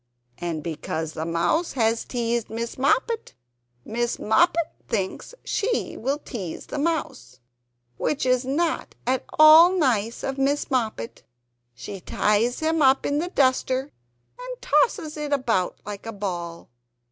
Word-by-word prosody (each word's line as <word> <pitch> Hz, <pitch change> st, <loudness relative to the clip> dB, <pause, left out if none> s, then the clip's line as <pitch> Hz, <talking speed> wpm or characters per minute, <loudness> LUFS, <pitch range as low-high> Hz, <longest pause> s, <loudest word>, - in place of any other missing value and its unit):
And 170 Hz, -3 st, -3 dB
because 160 Hz, -1 st, -4 dB
the 160 Hz, +1 st, -4 dB
Mouse 175 Hz, -, 0 dB
has 230 Hz, -2 st, +1 dB
teased 235 Hz, -2 st, -2 dB
Miss 230 Hz, +1 st, -4 dB
Moppet 450 Hz, -, 0 dB, 0.5 s
Miss 240 Hz, +2 st, -1 dB
Moppet 335 Hz, +8 st, +2 dB
thinks 200 Hz, -, -3 dB
she 460 Hz, +3 st, -1 dB
will 270 Hz, +5 st, -1 dB
tease 200 Hz, -, -7 dB
the -, -, -5 dB
Mouse, 285 Hz, -, -2 dB, 0.6 s
which 285 Hz, -, -1 dB
is 255 Hz, 0 st, +2 dB
not 310 Hz, +6 st, -1 dB
at 255 Hz, +1 st, 0 dB
all 310 Hz, +3 st, +9 dB
nice 235 Hz, -, +1 dB
of 270 Hz, 0 st, -3 dB
Miss 280 Hz, +2 st, 0 dB
Moppet. 220 Hz, -, -2 dB, 0.5 s
She 190 Hz, +11 st, -7 dB
ties 215 Hz, -, +1 dB
him 320 Hz, 0 st, +1 dB
up 270 Hz, -1 st, +4 dB
in 290 Hz, +1 st, +1 dB
the 350 Hz, +3 st, -2 dB
duster 260 Hz, -2 st, +1 dB, 0.5 s
and -, -, -7 dB
tosses 410 Hz, -11 st, +1 dB
it 300 Hz, -1 st, -4 dB
about 235 Hz, -10 st, 0 dB
like 205 Hz, +1 st, -7 dB
a 225 Hz, -, -5 dB
ball. 175 Hz, -7 st, -5 dB
255 Hz, 135 wpm, -24 LUFS, 205-305 Hz, 0.6 s, all